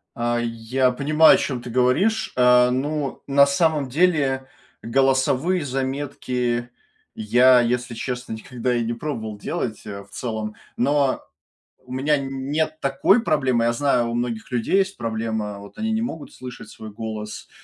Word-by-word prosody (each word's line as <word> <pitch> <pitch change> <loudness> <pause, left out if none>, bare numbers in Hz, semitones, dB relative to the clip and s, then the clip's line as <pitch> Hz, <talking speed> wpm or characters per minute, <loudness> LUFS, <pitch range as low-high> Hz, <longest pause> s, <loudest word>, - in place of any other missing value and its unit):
А, 120 0 0
я 120 +2 0
понимаю, 155 +7 +5
о - - +2
чем 130 -9 -3
ты 120 - -8
говоришь, 130 - +2
а, 125 0 +5
ну, 140 +2 -2
на 140 0 +6
самом 145 -1 +1
деле, 140 -4 +1 0.4
голосовые 135 +7 +2
заметки 130 -3 -2 0.5
я, 130 - +5
если 120 0 -1
честно, 125 0 -4
никогда 125 +2 -3
и 120 - 0
не 115 +1 -2
пробовал 115 -5 -5
делать 110 +1 -4
э, 100 -1 -7
в 100 - -23
целом, 110 -1 -4 0.2
но 140 +1 +2 0.6
у 125 - -15
меня 140 +4 +1
н 135 0 -5
нет 155 +1 -1
такой 140 - +3
проблемы, 130 - +1
я 120 - +2
знаю, 120 -2 +1
у - - -3
многих 120 0 -3
людей 125 +9 +1
есть 195 0 +1
проблема, 110 -2 -3
вот 100 0 -13
они 220 +1 -1
не 220 0 0
могут 165 -10 -5
слышать 125 -1 -9
свой 110 -1 -10
голос, 110 -1 -6
125 Hz, 155 wpm, -23 LUFS, 120-145 Hz, 0.6 s, на